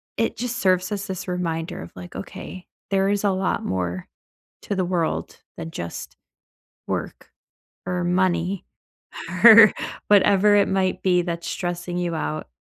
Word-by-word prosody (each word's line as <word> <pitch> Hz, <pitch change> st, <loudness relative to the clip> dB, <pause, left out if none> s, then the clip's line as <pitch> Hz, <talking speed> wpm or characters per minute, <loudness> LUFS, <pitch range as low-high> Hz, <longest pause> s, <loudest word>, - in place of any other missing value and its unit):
it 225 Hz, -, -1 dB
just 245 Hz, 0 st, -3 dB
serves 185 Hz, -3 st, +1 dB
as 200 Hz, -1 st, -3 dB
this 190 Hz, -1 st, -5 dB
reminder 175 Hz, 0 st, -3 dB
of, -, -, -10 dB
like, 175 Hz, -, -10 dB
"Okay, 185 Hz, -1 st, -8 dB, 0.2 s
there 195 Hz, 0 st, +2 dB
is 205 Hz, 0 st, 0 dB
a 200 Hz, -, +3 dB
lot 190 Hz, 0 st, -1 dB
more 90 Hz, -1 st, -3 dB, 0.6 s
to 200 Hz, -, -3 dB
the 185 Hz, -1 st, 0 dB
world 175 Hz, -2 st, -2 dB, 0.2 s
than 165 Hz, -1 st, -6 dB
just 85 Hz, -, -7 dB, 0.7 s
work, -, -, -5 dB, 0.5 s
or 180 Hz, 0 st, -2 dB
money, 180 Hz, +1 st, 0 dB, 0.8 s
or 225 Hz, -2 st, +10 dB, 0.4 s
whatever 205 Hz, 0 st, +5 dB
it 200 Hz, -, +4 dB
might 190 Hz, -1 st, 0 dB
be 180 Hz, -2 st, +3 dB
that's 170 Hz, -1 st, -4 dB
stressing 175 Hz, 0 st, -4 dB
you 175 Hz, -1 st, -2 dB
out." 155 Hz, -, -4 dB
185 Hz, 145 wpm, -23 LUFS, 175-195 Hz, 0.8 s, or